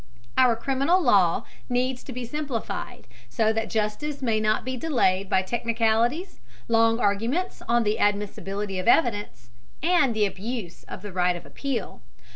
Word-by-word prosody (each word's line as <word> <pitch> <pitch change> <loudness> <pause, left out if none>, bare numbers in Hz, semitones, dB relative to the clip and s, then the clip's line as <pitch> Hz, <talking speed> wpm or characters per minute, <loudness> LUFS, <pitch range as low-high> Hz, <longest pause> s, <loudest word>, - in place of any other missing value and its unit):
Our 250 -3 +5
criminal 275 +9 +2
law 200 - +3 0.2
needs 250 +1 0
to - - -7
be 250 0 -5
simplified, 275 -3 -4 0.2
so 220 - +2
that 225 0 -2
justice 225 +7 -2
may 225 -3 +2
not 215 +1 +1
be 260 0 -2
delayed 215 -10 +1
by 190 - +2
technicalities, 230 - 0 0.3
long 225 0 +3
arguments 230 - 0
on 235 0 +3
the 210 0 0
admissibility 205 -1 -1
of 185 - -4
evidence, 205 - +1 0.3
and 315 -8 +3
the 215 -1 +3
abuse 200 -2 -5
of - - -9
the 205 -2 -7
right 180 -1 +2
of 175 - -9
appeal. 260 - -4
225 Hz, 150 wpm, -25 LUFS, 205-255 Hz, 0.3 s, Our